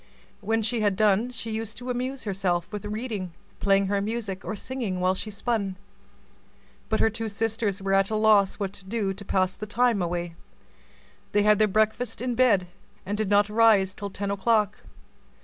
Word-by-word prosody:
When 225 +2 0
she 230 +1 0
had 205 -2 +2
done, 215 +3 +3
she 230 -2 -6
used 220 0 -4
to 250 +1 -4
amuse 255 +2 -3
herself 185 -4 -1
with 210 -1 -5
reading, 210 -4 -4 0.3
playing 195 0 +3
her 200 +1 0
music, 205 -3 -4
or 215 - -4
singing 220 -5 -3
while 185 +1 +2
she 200 +3 -4
spun. 205 -2 -2 1.1
But 220 - +1
her 225 - +3
two 225 0 -4
sisters 215 -2 -2
were 195 0 0
at 195 0 +4
a 220 - -1
loss 215 -2 +4
what 200 -2 -4
to 190 - -9
do 200 -1 -1
to 200 +2 -9
pass 185 -1 +1
the 215 - -7
time 235 -1 +2
away; 175 -1 -2 1.0
they 205 - +4
had 210 -1 +4
their 215 - +5
breakfast 220 +4 0
in 250 +1 -1
bed, 225 -7 +3 0.4
and 205 - -2
did 210 -2 -1
not 205 0 +4
rise 210 -3 +4
till 200 0 -6
ten 200 +1 -3
o'clock. 210 +1 +1
210 Hz, 185 wpm, -26 LUFS, 195-225 Hz, 1.1 s, their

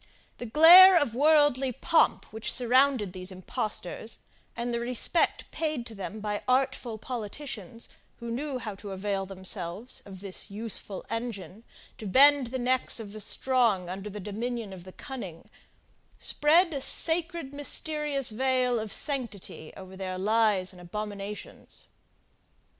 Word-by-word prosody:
The 245 - -5
glare 350 +8 +9
of 285 -7 -1
worldly 290 -1 +3
pomp 325 +7 +2
which 220 0 -2
surrounded 250 -5 +3
these 185 0 -6
impostors, 185 +3 -4 0.4
and 240 0 -3
the 235 - -1
respect 250 +7 -1
paid 305 -7 -2
to 230 - -8
them 205 +1 -7
by 210 -1 -3
artful 255 -3 0
politicians, 230 - -7 0.3
who 235 0 -6
knew 275 +3 -3
how 220 -4 -6
to 195 0 -9
avail 195 0 -3
themselves 190 +3 -4
of 190 -2 -11
this 195 -1 -3
useful 205 -2 -5
engine 225 -3 -5 0.4
to 215 - -6
bend 275 +5 +5
the 260 +3 -4
necks 255 0 0
of 210 -2 -8
the 215 - -7
strong 225 -5 +1
under 195 +3 -6
the 210 +1 -7
dominion 220 +1 -5
of 180 -2 -11
the 185 - -10
cunning, 190 - -9 0.7
spread 330 +3 +3
a 275 - -3
sacred 330 -1 +2
mysterious 290 -2 -1
veil 255 0 +1
of 215 -1 -5
sanctity 235 - -3
over 190 0 -11
their 185 -1 -5
lies 205 -2 +2
and 180 -1 -14
abominations. 205 +2 -7
230 Hz, 140 wpm, -28 LUFS, 200-265 Hz, 0.7 s, glare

